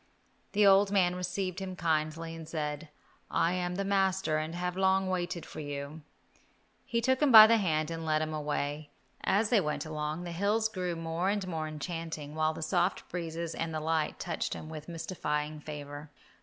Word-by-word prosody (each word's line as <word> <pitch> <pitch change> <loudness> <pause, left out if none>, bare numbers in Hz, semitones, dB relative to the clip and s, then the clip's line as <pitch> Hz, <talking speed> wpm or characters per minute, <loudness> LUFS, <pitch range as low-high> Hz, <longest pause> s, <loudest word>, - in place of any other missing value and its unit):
The 210 0 +4
old 195 0 +6
man 180 -3 +3
received 180 +1 -3
him 190 -1 -5
kindly, 165 0 -1
and 160 -1 -9
said, 150 0 -3 0.4
"I 170 - +2
am 180 -1 -1
the 195 +1 -2
master 190 -5 +1
and 155 +2 -4
have 180 0 -2
long 190 0 +3
waited 175 -1 -2
for - - -9
you." 145 +1 -5 0.8
He 235 0 -1
took 260 +3 +2
him 295 -3 +4
by 220 -2 +12
the 230 +1 +5
hand 155 -5 0
and 165 0 -4
led 155 -1 +1
him 155 0 -4
away. 150 0 -2 0.3
As 210 +2 +2
they 225 -5 +5
went 150 -1 -2
along, 155 +2 -3
the 175 - -5
hills 205 +5 +1
grew 180 -4 -3
more 165 +3 -1
and 200 -2 -1
more 160 -3 -3
enchanting, 155 -1 -5
while 155 0 +1
the 160 - -5
soft 175 +3 0
breezes 170 -1 -4
and 165 -1 -3
the - - 0
light 160 0 0
touched 170 - -2
him 155 - -8
with 155 0 -8
mystifying 155 -3 -3
favour. 145 0 -8
165 Hz, 185 wpm, -30 LUFS, 155-185 Hz, 0.8 s, by